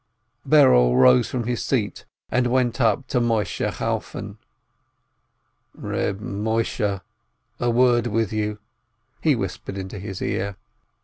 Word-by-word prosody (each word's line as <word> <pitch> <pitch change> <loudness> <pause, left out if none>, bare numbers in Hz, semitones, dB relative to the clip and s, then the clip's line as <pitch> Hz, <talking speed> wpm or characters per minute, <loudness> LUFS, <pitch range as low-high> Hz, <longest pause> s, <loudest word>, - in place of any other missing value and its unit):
Berel 130 - +5
rose 65 -1 +5
from 125 -2 -2
his 120 +1 -2
seat, 115 -7 -2 0.3
and 125 +1 +2
went 125 0 +1
up 110 -4 +2
to 125 - +1
Moisheh 110 -5 0
Chalfon. - - -4 1.4
"Reb 100 0 -3
Moisheh, 105 -1 -2 0.6
a 120 - +1
word 120 0 +3
with 110 -1 -1
you," 105 -1 -2 0.6
he 155 -3 +3
whispered 95 -2 -5
into 95 +1 -6
his 95 -1 -6
ear. 100 0 -2
110 Hz, 120 wpm, -23 LUFS, 100-120 Hz, 1.4 s, Berel